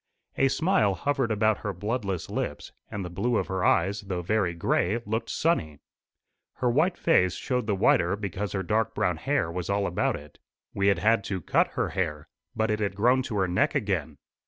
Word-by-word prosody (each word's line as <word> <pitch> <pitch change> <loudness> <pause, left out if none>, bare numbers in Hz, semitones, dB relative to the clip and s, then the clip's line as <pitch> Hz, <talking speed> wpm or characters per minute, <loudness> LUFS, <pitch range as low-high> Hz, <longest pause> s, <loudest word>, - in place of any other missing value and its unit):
A 135 - +3
smile 135 - +2
hovered 140 -2 0
about 110 -1 +2
her 105 - -3
bloodless 100 -2 -3
lips, - - -4 0.2
and 100 -3 -4
the - - -5
blue 115 +6 0
of - - 0
her 95 -1 -1
eyes, 100 +4 +2
though 95 -3 -4
very 95 -2 0
gray, 90 +5 +1
looked 110 +3 -2
sunny. 80 - 0 0.8
Her 125 -1 +1
white 170 +8 +2
face 95 - +3
showed 125 -4 -2
the 105 - +1
whiter 90 -1 +3
because 100 -1 -4
her 95 -1 -1
dark 110 +4 0
brown - - +1
hair 85 - 0
was 90 +1 -4
all 100 0 +1
about 90 - 0
it. 75 +1 -12 0.3
We 100 0 +1
had 100 -2 +4
had 110 +3 +2
to 95 -2 -2
cut 80 - +2
her - - -1
hair, 75 -6 -2 0.3
but 110 0 +1
it 105 - 0
had 100 -2 -1
grown 125 +6 +3
to 120 -5 -4
her 95 -2 +2
neck 90 +4 +1
again. 85 -8 -1
100 Hz, 200 wpm, -27 LUFS, 90-115 Hz, 0.8 s, had